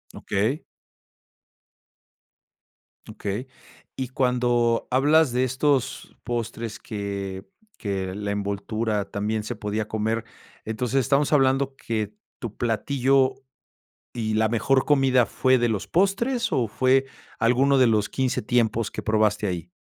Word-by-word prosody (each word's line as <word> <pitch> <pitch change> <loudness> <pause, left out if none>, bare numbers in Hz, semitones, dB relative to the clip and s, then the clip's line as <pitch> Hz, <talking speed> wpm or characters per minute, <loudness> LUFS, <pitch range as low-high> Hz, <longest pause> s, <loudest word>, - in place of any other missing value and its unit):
Okey. 110 +10 -1 2.4
Okey. 105 +6 -4 0.5
Y 130 -2 -4
cuando 120 -2 +1
hablas 145 +2 +4
de 125 +1 +1
estos 130 +1 0
postres 115 -2 -4
que 100 -2 -5 0.3
que 95 -3 -3
la 100 +1 -3
envoltura 100 +1 -2
también 105 +1 -2
se 120 - -4
podía 105 +1 -3
comer, 110 +1 -1 0.4
entonces 120 +4 0
estamos 140 +3 +2
hablando 135 -1 +2
que 110 - -3 0.3
tu 115 -4 -7
platillo 130 +3 +2 0.8
y 110 -2 -2
la 110 0 +2
mejor 130 +4 +2
comida,¿fue 130 -2 +3
de 120 0 +2
los 105 -3 -2
postres 230 +6 +1
o 120 -4 +1
fue 130 +4 +3 0.3
alguno 130 +5 +3
de 130 -2 +5
los 105 -2 +2
15 130 -1 -1
tiempos 115 -1 +1
que - - -6
probaste 110 -1 +1
ahí? 90 -2 -4
115 Hz, 120 wpm, -24 LUFS, 105-130 Hz, 2.4 s, de